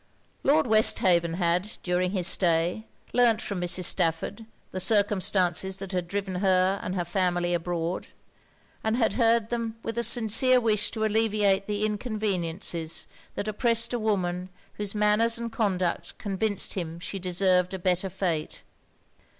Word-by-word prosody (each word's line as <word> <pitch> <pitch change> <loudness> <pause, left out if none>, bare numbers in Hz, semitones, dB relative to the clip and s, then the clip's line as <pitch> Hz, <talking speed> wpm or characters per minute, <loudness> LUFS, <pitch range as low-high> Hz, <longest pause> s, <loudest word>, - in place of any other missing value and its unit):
Lord 300 +2 +3
Westhaven 185 -6 +3
had, 175 +3 0
during 180 0 0
his 185 -2 -1
stay, 175 +4 +2 0.3
learnt 235 -3 +4
from 200 -5 -4
Mrs. 180 +1 +1
Stafford 165 +7 0 0.2
the 185 - -4
circumstances 190 -3 +2
that 195 -1 -6
had 180 -2 -2
driven 195 0 -3
her 190 0 +2
and 185 - -4
her 175 -2 -1
family 175 -1 0
abroad; 170 0 -2 0.8
and 220 +1 0
had 225 -3 +2
heard 230 -2 +2
them 230 -1 -3
with 230 +1 -3
a - - 0
sincere 240 +3 +3
wish 215 -3 +1
to 220 -1 -2
alleviate 210 -3 +1
the 210 0 -1
inconveniences 195 -7 -2 0.3
that 205 - -3
oppressed 230 +2 +1
a 240 - 0
woman 185 -4 -1 0.2
whose 205 0 -4
manners 210 +3 +3
and 235 0 -5
conduct 190 -6 -1
convinced 205 0 -1
him 170 -3 -5
she 195 +3 -5
deserved 180 0 +2
a - - -3
better 185 +1 0
fate. 175 -4 -3
195 Hz, 145 wpm, -26 LUFS, 180-220 Hz, 0.8 s, learnt